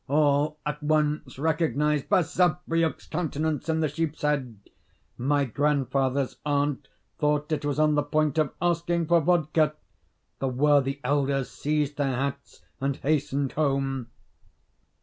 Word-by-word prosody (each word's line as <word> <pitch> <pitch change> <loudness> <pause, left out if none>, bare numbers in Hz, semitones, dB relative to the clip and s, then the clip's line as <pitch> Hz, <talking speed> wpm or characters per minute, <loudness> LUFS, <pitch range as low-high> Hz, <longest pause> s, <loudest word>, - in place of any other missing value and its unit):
All 145 +1 +2
at 150 0 -3
once 150 -2 0
recognised 150 -1 0
Basavriuk's 175 -2 +1
countenance 160 -2 -2
in 160 0 +1
the 155 - +2
sheep's 155 +1 -3
head; 140 -6 0 0.6
my 140 +3 +1
grandfather's 135 0 0
aunt 145 -1 0 0.3
thought 150 0 0
it 155 - -1
was 145 -1 -1
on 155 0 +3
the 145 - +3
point 155 0 0
of 155 -3 +1
asking 170 0 0
for 170 +1 +4
vodka. 155 -2 +2 0.6
The 135 - -1
worthy 140 +1 +2
elders 135 0 0
seized 150 -1 -1
their 135 -3 0
hats 140 +2 -4 0.2
and 135 0 -1
hastened 140 -2 0
home. 135 -4 -1
150 Hz, 130 wpm, -26 LUFS, 140-155 Hz, 0.6 s, for